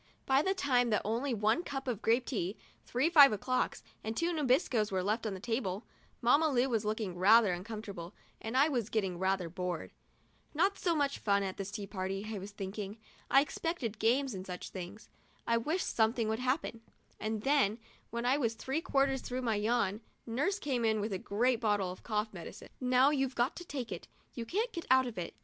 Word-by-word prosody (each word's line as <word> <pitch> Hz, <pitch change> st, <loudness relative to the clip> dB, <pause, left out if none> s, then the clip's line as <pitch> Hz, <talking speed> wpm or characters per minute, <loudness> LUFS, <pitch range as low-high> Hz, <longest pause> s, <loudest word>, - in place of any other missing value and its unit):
By 270 Hz, +1 st, +4 dB
the 385 Hz, +5 st, 0 dB
time 250 Hz, -8 st, +2 dB
that 210 Hz, -, +1 dB
only 235 Hz, +6 st, -1 dB
one 215 Hz, -1 st, +2 dB
little 350 Hz, -, -6 dB
cup 270 Hz, 0 st, -4 dB
of 230 Hz, -4 st, -2 dB
grape 235 Hz, +3 st, +2 dB
tea, 200 Hz, -5 st, -2 dB, 0.3 s
three 255 Hz, +6 st, +1 dB
five 290 Hz, -6 st, +8 dB
o'clocks 255 Hz, +5 st, -1 dB, 0.2 s
and 220 Hz, +1 st, -4 dB
two 345 Hz, +1 st, +1 dB
Nabiscos 255 Hz, -, +2 dB
were 185 Hz, -1 st, 0 dB
left 215 Hz, +3 st, 0 dB
on 200 Hz, -, -3 dB
the -, -, -7 dB
table, 220 Hz, -2 st, -2 dB, 0.4 s
Mamma 285 Hz, +7 st, +4 dB
Lu 255 Hz, -2 st, +2 dB
was 225 Hz, -4 st, 0 dB
looking 215 Hz, -3 st, -2 dB
rather 210 Hz, +1 st, +6 dB
uncomfortable 195 Hz, -2 st, -7 dB, 0.3 s
and 225 Hz, +3 st, -2 dB
I 280 Hz, +3 st, +6 dB
was 240 Hz, -8 st, -1 dB
getting 190 Hz, -5 st, -1 dB
rather 190 Hz, -1 st, +1 dB
bored. 180 Hz, -1 st, -4 dB, 0.6 s
"Not 385 Hz, +6 st, +2 dB
so 345 Hz, -3 st, +1 dB
much 285 Hz, -2 st, 0 dB
fun 200 Hz, -1 st, +2 dB
in 190 Hz, -1 st, -2 dB
this 195 Hz, 0 st, -5 dB
tea 205 Hz, -1 st, -5 dB
party," 195 Hz, 0 st, -4 dB
I 210 Hz, -, -3 dB
was 195 Hz, +2 st, -7 dB
thinking; 200 Hz, +1 st, -6 dB, 0.2 s
" -, -, -26 dB
I 275 Hz, -, +7 dB
expected 280 Hz, -7 st, -3 dB
games 255 Hz, +3 st, +2 dB
and 185 Hz, -1 st, -5 dB
such 180 Hz, -1 st, -6 dB
things. 190 Hz, +4 st, -8 dB, 0.4 s
I 230 Hz, -, +2 dB
wish 310 Hz, +10 st, 0 dB
something 225 Hz, 0 st, +1 dB
would 220 Hz, +1 st, -1 dB
happen;' 255 Hz, -2 st, -1 dB, 0.4 s
and 215 Hz, 0 st, -3 dB
then, 270 Hz, -7 st, +3 dB, 0.3 s
when 235 Hz, +1 st, -3 dB
I 260 Hz, +3 st, +3 dB
was 230 Hz, -4 st, 0 dB
three 265 Hz, +7 st, -2 dB
quarters 275 Hz, -5 st, +1 dB
through 250 Hz, -, -4 dB
with -, -, -5 dB
my 225 Hz, -2 st, +2 dB
yawn, 215 Hz, -1 st, +1 dB, 0.2 s
nurse 285 Hz, -, 0 dB
came 260 Hz, -, -1 dB
in 220 Hz, -1 st, +2 dB
with 210 Hz, 0 st, -2 dB
a 190 Hz, -, -2 dB
great 235 Hz, +5 st, +1 dB
bottle 205 Hz, -4 st, +1 dB
of 185 Hz, -, -10 dB
cough 215 Hz, -1 st, -2 dB
medicine. 170 Hz, -3 st, -9 dB
" -, -, -38 dB
Now 255 Hz, +2 st, +4 dB
you've 270 Hz, -3 st, 0 dB
got 240 Hz, +4 st, +1 dB
to 350 Hz, -, -7 dB
take 260 Hz, -8 st, -5 dB
it; 175 Hz, -, -6 dB, 0.3 s
you 230 Hz, -2 st, -5 dB
can't 445 Hz, -, -1 dB
get 335 Hz, -, -5 dB
out 260 Hz, 0 st, +6 dB
of 235 Hz, -6 st, -5 dB
it. 170 Hz, -9 st, -5 dB
230 Hz, 215 wpm, -32 LUFS, 205-265 Hz, 0.6 s, five